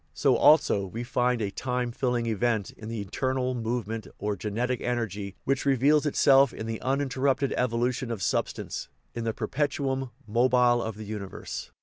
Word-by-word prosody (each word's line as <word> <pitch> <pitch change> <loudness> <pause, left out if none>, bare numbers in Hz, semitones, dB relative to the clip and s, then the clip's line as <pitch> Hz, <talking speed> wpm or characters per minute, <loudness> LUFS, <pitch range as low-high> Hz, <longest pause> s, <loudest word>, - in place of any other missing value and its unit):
So - - +3
also 120 -10 +5
we 115 +6 -5
find 125 -1 +1
a 100 - -2
"time 125 +1 -2
filling" 120 -1 -1
event 110 -2 0
in 110 - -10
the 115 -1 -4
eternal 130 +5 -1
movement, 115 -3 -3
or 105 0 -2
genetic 115 +5 -2
energy, 105 -5 -3
which 135 0 0
reveals 140 +3 +3
itself 135 -2 +5
in 110 - -6
the 115 -1 -4
uninterrupted 135 0 0
evolution 125 +1 0
of 110 -5 -3
substance, - - -2 0.2
in 115 -1 -4
the 115 - 0
perpetuum 135 -2 -1 0.2
mobile 120 +1 +3
of 110 -2 -4
the 110 - -7
universe. 100 -2 -6
120 Hz, 155 wpm, -27 LUFS, 110-130 Hz, 0.2 s, also